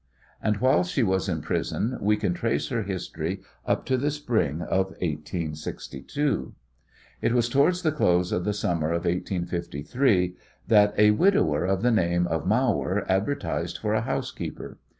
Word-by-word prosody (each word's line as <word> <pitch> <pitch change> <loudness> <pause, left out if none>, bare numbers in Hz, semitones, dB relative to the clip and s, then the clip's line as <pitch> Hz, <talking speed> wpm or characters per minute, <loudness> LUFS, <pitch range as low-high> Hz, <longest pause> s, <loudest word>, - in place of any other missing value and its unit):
And 105 -1 +1
while 125 -6 +3
she 105 +8 0
is 95 -1 +1
in 80 -3 -1
prison 125 +4 -1
we 105 +1 +3
can 100 -4 0
trace 115 +6 -1
her 120 -3 -1
history 95 -2 -4 0.3
up - - 0
to 130 - +1
the 140 +4 0
spring 115 - -1
of 95 0 +1
1862. 80 - -3 0.7
It - - +1
was 120 -1 +3
towards 140 +8 +2
the 155 - +3
close 90 - +2
of 90 - 0
the 105 - 0
summer 85 -6 -1
of 85 +1 -1
1853 90 - 0 0.3
that 105 -1 +5
a 105 0 +6
widower 190 - +3
of 95 +2 0
the 125 - +4
name 85 -5 +2
of 80 -1 -2
Mawer 105 -4 +1
advertised 105 +10 -1
for 105 -1 -1
a 110 - +2
housekeeper. 115 - -4
100 Hz, 155 wpm, -26 LUFS, 85-120 Hz, 0.7 s, a